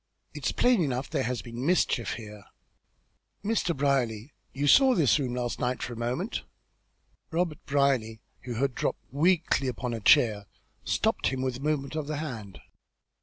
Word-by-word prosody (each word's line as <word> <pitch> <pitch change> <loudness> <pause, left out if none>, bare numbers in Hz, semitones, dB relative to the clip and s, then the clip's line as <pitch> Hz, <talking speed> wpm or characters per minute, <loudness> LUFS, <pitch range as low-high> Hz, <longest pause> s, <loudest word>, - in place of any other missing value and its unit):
"It's - - -2
plain 245 -5 +3
enough 130 -2 -2
there - - 0
has 125 -2 -3
been 120 +1 -6
mischief 150 -7 +1
here. 105 -3 -9 1.0
Mr. 200 -7 0
Brierly, 130 -3 0 0.2
you 140 +2 -2
saw 265 - +6
this 155 -3 +4
room 125 -3 -2
last 120 -1 -3
night, 125 +1 -1
for 120 - -4
a - - -8
moment." 125 - -2 0.9
Robert 165 -2 -2
Brierly, 135 -6 +1 0.3
who 120 -2 -4
had 135 +2 0
dropped - - -2
weakly 155 -2 +2
upon 125 0 -3
a 115 - -3
chair, 105 -1 +4 0.4
stopped - - +1
him 130 -1 -1
with 130 -2 -1
a - - -12
movement 145 -1 -1
of 155 -2 -3
the 155 -1 -3
hand. 115 - -6
130 Hz, 165 wpm, -28 LUFS, 120-150 Hz, 1.0 s, saw